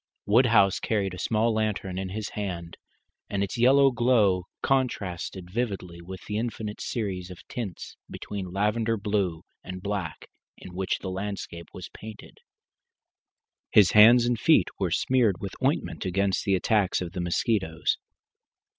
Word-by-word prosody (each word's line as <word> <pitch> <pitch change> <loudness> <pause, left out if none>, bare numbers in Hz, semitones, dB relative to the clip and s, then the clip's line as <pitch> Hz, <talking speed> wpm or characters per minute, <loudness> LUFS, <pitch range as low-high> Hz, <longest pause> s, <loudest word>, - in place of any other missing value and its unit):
Woodhouse 105 -3 +4
carried 100 -4 -1
a 90 - -7
small 115 +3 +1
lantern 105 -4 -2
in 95 -1 -4
his 105 +2 -4
hand, 90 -5 -5 0.5
and 100 -1 -1
its 100 - -4
yellow 135 +3 +5
glow 110 -7 +2 0.2
contrasted 95 -9 -1
vividly 95 -7 -3
with 95 +1 -9
the 105 - -3
infinite 110 -2 -4
series 95 -6 -3
of 90 - -12
tints 105 -8 -6
between 95 -3 -6
lavender 110 +4 0
blue 100 -5 -1 0.2
and 90 0 -8
black 100 -6 -4 0.3
in 90 - -11
which 95 +1 -1
the 95 - -3
landscape 95 -3 -5
was 90 - -9
painted. 110 0 -11 1.3
His 100 -5 +6
hands 115 +3 +8
and 120 -2 0
face 160 - +5 0.2
were 95 -3 0
smeared 115 +3 +2
with 100 -2 -6
ointment - - 0
against 95 +1 0
the 100 - +3
attacks 100 +1 +1
of 90 -2 -5
the 90 - -4
mosquitoes. 85 -1 0
100 Hz, 145 wpm, -26 LUFS, 90-110 Hz, 1.3 s, hands